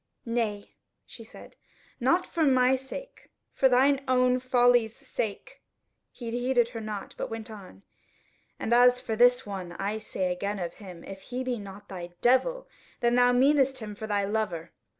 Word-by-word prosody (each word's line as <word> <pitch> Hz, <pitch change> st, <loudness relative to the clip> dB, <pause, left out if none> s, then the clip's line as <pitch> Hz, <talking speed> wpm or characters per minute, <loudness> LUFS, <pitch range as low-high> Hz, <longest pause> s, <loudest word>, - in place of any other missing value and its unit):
"Nay," 225 Hz, -4 st, -2 dB, 0.3 s
she -, -, -11 dB
said, -, -, -14 dB, 0.4 s
"not 340 Hz, +9 st, +2 dB
for 330 Hz, -, -1 dB
my 260 Hz, -2 st, +4 dB
sake, 270 Hz, -, -9 dB, 0.2 s
for 265 Hz, -, +3 dB
thine 270 Hz, +2 st, +4 dB
own 255 Hz, 0 st, +3 dB
folly's 245 Hz, -3 st, +3 dB
sake." 230 Hz, -6 st, -5 dB, 0.5 s
He 235 Hz, -2 st, -7 dB
heeded 245 Hz, 0 st, +1 dB
her 230 Hz, -2 st, -7 dB
not, 215 Hz, -2 st, -6 dB
but -, -, -3 dB
went 225 Hz, 0 st, -7 dB
on: 185 Hz, -, -12 dB, 0.7 s
"And 235 Hz, -, -1 dB
as 250 Hz, +1 st, +6 dB
for 225 Hz, -3 st, -3 dB
this 245 Hz, +2 st, +4 dB
one, 190 Hz, -4 st, -6 dB
I 200 Hz, +4 st, -3 dB
say 185 Hz, -4 st, -2 dB
again 200 Hz, +3 st, -3 dB
of 175 Hz, -2 st, -4 dB
him, 180 Hz, -5 st, -11 dB
if 195 Hz, 0 st, -9 dB
he 250 Hz, +4 st, -5 dB
be 250 Hz, -2 st, -2 dB
not 200 Hz, 0 st, -10 dB
thy 175 Hz, -2 st, -8 dB
devil, -, -, +2 dB, 0.3 s
then 235 Hz, 0 st, +2 dB
thou 245 Hz, 0 st, +5 dB
meanest 270 Hz, +1 st, +3 dB
him 215 Hz, -4 st, -7 dB
for 215 Hz, +1 st, -7 dB
thy 205 Hz, -1 st, 0 dB
lover. 195 Hz, -6 st, -2 dB
235 Hz, 170 wpm, -27 LUFS, 205-255 Hz, 0.7 s, as